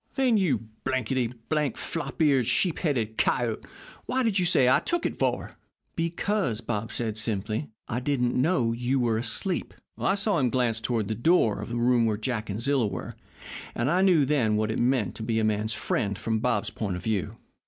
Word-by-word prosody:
"'Then, 260 -4 +3
you 135 - +1 0.2
blankety 130 -1 0 0.2
blank, 150 -4 0
flop 165 - -5
eared, 135 -6 +3
sheep 180 -4 +1
headed 115 - -1
coyote, 120 -3 +1 0.4
what 260 0 +1
did 215 -5 +2
you 180 - +2
say 175 -7 +4
you 130 - +5
took 345 -1 -1
it, - - 0
for?' - - -1 0.4
"'Because,' 170 - -1
said 120 - -10
Bob, 110 -1 -3
simply, 110 +1 -2 0.2
'I 120 - -2
didn't 125 -2 0
know 130 -4 +2
you 125 +3 0
were 115 -3 +1
asleep.' 180 - -1 0.2
"I 195 - +2
saw 200 -3 +1
him 130 -3 +2
glance 120 -3 0
toward 115 -4 -1
the 110 - -1
door 115 - +2
of 105 - -6
the 120 - -3
room 120 -1 +3
where 105 -2 0
Jack 110 -1 -3
and 100 +2 -3
Zilla 135 -2 +1
were, 95 -3 -6 0.6
and 120 +5 0
I 180 +2 +3
knew 175 -7 +5
then 130 -7 +2
what 110 +1 0
it - - -2
meant 120 -5 +1
to - - -7
be 115 0 -1
a 110 - +1
man's 110 0 0
friend 100 -2 -1
from 110 +1 -1
Bob's 120 -3 0
point 100 -5 -3
of 90 - -7
view." 105 -7 -2
120 Hz, 200 wpm, -27 LUFS, 110-150 Hz, 0.6 s, you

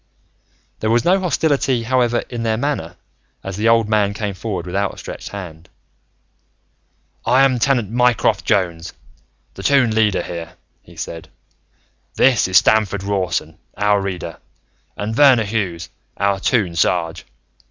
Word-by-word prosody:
There 110 - -1
was 115 +1 +2
no 185 +2 +4
hostility, 140 -8 0
however, 120 -1 +1
in 120 -1 -5
their 110 -1 0
manner 115 - -3 0.5
as 95 -1 -5
the 110 +3 +1
old 115 -1 +3
man 105 -2 +1
came 105 -2 -3
forward 95 -2 -5
with 90 - -6
outstretched 100 0 -4
hand. 90 -4 -9 1.5
"I 130 +2 +4
am 130 -2 +2
Tenant 120 -5 +1
Mycroft 120 -3 +2
Jones, 90 -6 -1 0.6
the - - -9
Toon 135 -6 +3
Leader 110 -3 +2
here," 85 -1 -7 0.3
he - - -18
said. 80 -1 -7 0.9
"This 125 -7 +3
is 95 -1 +4
Stamford 105 -1 +2
Rawson, 90 -6 -2 0.2
our 105 0 +2
Reader, 90 -4 -5 0.6
and 105 +2 -3
Verner 130 -4 +6
Hughes, 95 -6 -3 0.3
our 100 0 +1
Toon 100 -5 0
Sarge. 85 0 0
105 Hz, 135 wpm, -19 LUFS, 90-120 Hz, 1.5 s, Verner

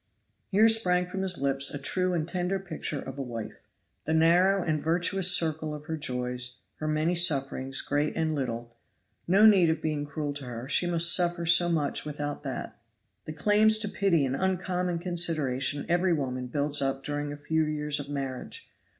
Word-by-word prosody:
Here 210 +3 +5
sprang 180 -6 +3
from 190 +2 -5
his 185 -2 +2
lips 135 0 +1
a - - -4
true 180 +7 -1
and 160 -2 -2
tender 180 +2 -1
picture 165 -5 -5
of 135 +1 -8
a - - -1
wife. 115 -4 -7 0.5
The 160 - 0
narrow 180 +4 +4
and 155 -2 -1
virtuous 180 +3 +3
circle 160 -3 +1
of 150 0 -10
her 160 - -3
joys, 125 -3 -3 0.2
her 155 - -4
many 155 +3 0
sufferings, 135 -6 0
great 145 +1 -1
and 160 -1 0
little 120 -4 -4 0.5
no 195 +5 +5
need 190 -6 +6
of 160 -1 0
being 150 -2 -3
cruel 145 0 -4
to 140 -2 -8
her; 120 0 -7
she 175 +4 +1
must 170 -1 +5
suffer 175 -1 0
so 175 +1 +4
much 155 -4 0
without 145 -1 -5
that. - - -6 0.5
The 155 - -6
claims 215 +6 +3
to 215 -1 -2
pity 185 -8 +1
and 130 0 -2
uncommon 180 0 -1
consideration 155 -6 0
every 175 +1 +2
woman 130 -4 -3
builds 145 +3 0
up 135 0 -1
during 145 0 -3
a 145 - -7
few 160 +2 0
years 150 -1 -2
of 145 0 -7
marriage! 140 - -6
155 Hz, 185 wpm, -27 LUFS, 140-180 Hz, 0.5 s, need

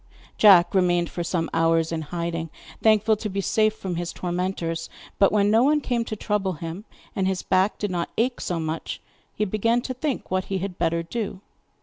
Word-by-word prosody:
Jack 190 -5 +6
remained 175 -2 +2
for 175 - -3
some 165 -1 -1
hours 165 0 +2
in 165 -1 -2
hiding, 165 +1 -4 0.3
thankful 220 0 +4
to 215 - -4
be 195 0 -3
safe 215 +2 +2
from 185 -5 -4
his 175 0 -3
tormentors; 175 -2 -3 0.3
but 195 - +5
when 205 -1 +3
no 225 +2 +5
one 295 +4 +4
came 245 -5 -1
to 215 - -4
trouble 205 -2 -1
him, 165 +5 -7 0.3
and 190 -3 +1
his 190 -1 -1
back 190 +2 +2
did 205 -2 -2
not 170 -2 -2
ache 245 +2 0
so 175 -2 -2
much, 160 0 -4 0.4
he 210 - 0
began 220 +4 +1
to 255 - -4
think 260 -3 -3
what 185 0 0
he 195 - -2
had 185 -1 -5
better 165 0 +1
do. 195 +1 -4
185 Hz, 200 wpm, -24 LUFS, 170-215 Hz, 0.4 s, Jack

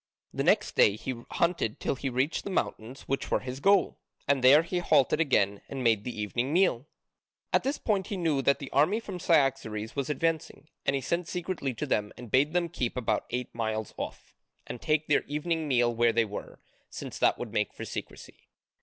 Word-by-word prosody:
The - - -1
next - - +2
day 100 - +5
he 130 +4 -4 0.2
hunted 170 -11 0
till - - -1
he 135 0 -3
reached 130 +5 0
the - - -5
mountains 130 - -3
which 135 - -3
were - - +1
his 130 +1 -6
goal. 200 +5 +3 0.3
And 140 -2 +2
there 140 +5 +8
he 175 +1 -2
halted 150 -4 +3
again 100 -9 +2
and 135 -2 -4
made 110 -3 +3
the 120 -2 -6
evening 120 +6 -1
meal. 160 -7 +2 0.7
At - - +4
this 275 +3 -1
point 195 -4 0
he 200 - -3
knew 160 -6 +1
that 140 +1 +3
the 140 - -8
army 160 +10 +3
from 195 -5 -7
Cyaxares 135 -10 +1
was 140 -1 -2
advancing, 160 -1 -2 0.2
and 140 - +3
he 135 - -2
sent 170 +4 -1
secretly 175 -8 -3
to - - -3
them 105 0 0
and 120 -3 -10
bade 140 +4 +3
them 175 -1 +1
keep 125 -7 -3
about 110 -4 -1
eight 125 0 -4
miles 110 -2 -3
off, - - -7 0.3
and 120 - -7
take 155 0 +1
their 150 - +3
evening 155 +2 -2
meal 120 -3 +2
where 120 0 +3
they 115 0 +2
were, 105 -1 -8 0.3
since - - -7
that - - +3
would - - -6
make - - 0
for - - -8
secrecy. - - -8
135 Hz, 205 wpm, -28 LUFS, 120-165 Hz, 0.7 s, there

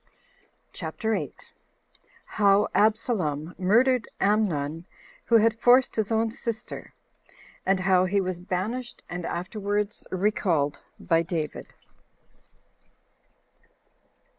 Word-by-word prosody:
CHAPTER 195 +6 -3
8. - - -5 0.7
How 200 -1 +3
Absalom 185 - +1
Murdered 235 +6 +3
Amnon, 175 -7 0 0.4
Who 235 - +3
Had 225 +1 +2
Forced 245 +2 +5
His 220 -1 -1
Own 225 0 +1
Sister; 230 -1 -6 0.7
And 190 -1 +2
How 185 -1 +4
He 200 +2 +1
Was 185 -2 -2
Banished 210 +7 -4
And 175 -1 -4
Afterwards 205 +3 -3
Recalled 180 -7 0 0.2
By 165 0 +2
David. 165 -3 -5
200 Hz, 90 wpm, -26 LUFS, 180-220 Hz, 0.7 s, Forced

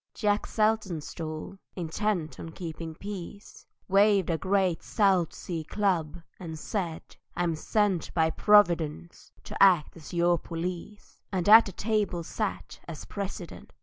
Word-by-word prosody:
Jack 205 -1 0
Saltonstall, 190 -5 -2 0.2
intent 175 0 -2
on 165 - -7
keeping 165 -2 -7
peace, 200 +1 -9 0.2
Waved 195 -2 +4
a 165 - 0
great 190 -3 +1
South 190 -6 +2
Sea 165 -3 -5
club, 175 -3 -1 0.2
and 165 -4 -7
said, 170 -1 -4 0.3
"I'm 175 -2 0
sent 190 +2 0
By 160 -1 +3
Providence 170 - +2
to - - -9
act 180 -6 +5
as 160 -3 -11
your 175 0 +2
police;" 180 +4 -7
And 185 -2 -1
at 220 +2 +9
the - - -5
table 205 -3 -1
sat 210 +4 -4
as 165 -3 -8
President. 195 -4 -7
180 Hz, 130 wpm, -28 LUFS, 165-205 Hz, 0.3 s, at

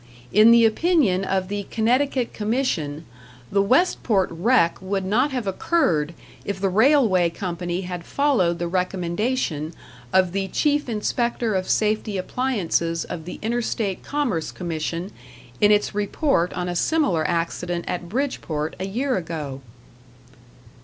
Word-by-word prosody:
In 215 +3 +7
the 235 0 +7
opinion 225 - +2
of 190 -1 -1
the 205 0 -4
Connecticut 250 +3 +1
Commission, 210 - -1 0.5
the 200 - +3
Westport 220 - +2
wreck 170 0 +2
would 190 0 -2
not 240 +9 +2
have 255 -5 -3
occurred 175 - +1 0.3
if 200 -1 -4
the 195 0 +1
railway 215 - +4
company 175 0 -4
had 180 -2 -5
followed 220 -10 +1
the 175 - -2
recommendation 180 - -1 0.4
of 185 -2 +3
the 195 +1 -1
Chief 290 +5 0
Inspector 235 +1 -1
of 185 -1 -1
Safety 215 -1 +1
Appliances 185 -7 -1
of 160 -2 -7
the 180 - -7
Interstate 225 -4 -1
Commerce 250 - -1
Commission 170 +2 -4 0.5
in 205 - +5
its 210 0 +2
report 205 - 0
on 180 -1 -3
a 175 - -3
similar 190 - +1
accident 170 +1 -2
at 175 -1 -4
Bridgeport 175 - -2
a 190 - -3
year 255 +7 -1
ago. 155 -6 -5
195 Hz, 135 wpm, -23 LUFS, 175-235 Hz, 0.5 s, In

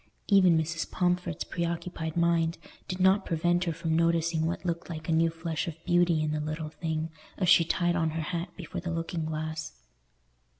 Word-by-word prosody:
Even 185 -5 +5
Mrs. 160 +1 -2
Pomfret's 180 -2 0
preoccupied 170 -1 -3
mind 170 -1 +2 0.3
did 185 0 -4
not 190 +2 +4
prevent 175 +1 +1
her 170 - 0
from 165 0 -1
noticing 165 -1 +2
what 170 +1 -3
looked 170 -1 -2
like 155 -2 -6
a - - 0
new 165 +1 +4
flush 165 -2 -3
of 165 - -4
beauty 175 -3 +3
in 155 - 0
the 155 - -1
little 155 +1 -4
thing 160 +1 -3 0.3
as 185 - 0
she 180 -2 +7
tied 175 +1 +1
on 165 -2 +1
her 160 - -1
hat 170 +2 -3
before 175 0 -6
the 175 - -4
looking 165 -1 -2
glass. 155 0 -4
165 Hz, 185 wpm, -29 LUFS, 160-175 Hz, 0.3 s, she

